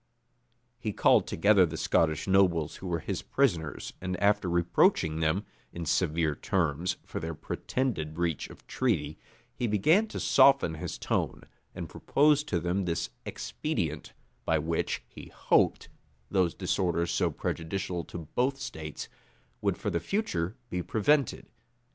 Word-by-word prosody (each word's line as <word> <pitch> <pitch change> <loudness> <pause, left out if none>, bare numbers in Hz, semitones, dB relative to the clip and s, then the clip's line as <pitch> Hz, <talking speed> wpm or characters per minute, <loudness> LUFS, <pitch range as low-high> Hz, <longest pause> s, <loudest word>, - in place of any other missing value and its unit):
He 110 -4 -3
called - - +4
together 100 +2 +4
the 85 - -1
Scottish 80 -2 +1
nobles 90 -5 +3
who 95 - -7
were 85 -2 -1
his - - -3
prisoners 85 - -1
and 90 -1 -3
after 100 -2 +2
reproaching 85 -2 +2
them, 80 +6 +1 0.3
in 85 -1 -6
severe 80 +1 +1
terms, 85 +2 -1
for - - -5
their 80 0 -4
pretended 80 - -3
breach 85 -3 -1
of - - -14
treaty, 80 - -1 0.3
he 120 - -2
began 155 - +3
to - - -6
soften 135 -12 +5
his 80 - -5
tone, - - -2 0.3
and - - -5
proposed 150 +1 +2
to 85 - 0
them 90 +3 -1
this 85 -7 -2 0.2
expedient, - - -3 0.3
by 80 - +2
which, 80 +2 -1
he - - -11
hoped, - - +2 0.4
those 90 -3 +2
disorders 85 -2 0
so - - +2
prejudicial 90 +1 -3
to 85 -3 -8
both 135 +2 +1
states, 80 - -6 0.5
would - - 0
for - - -2
the 85 - 0
future 95 - -2 0.2
be 90 - -1
prevented. 135 - +1
85 Hz, 140 wpm, -29 LUFS, 80-105 Hz, 0.5 s, soften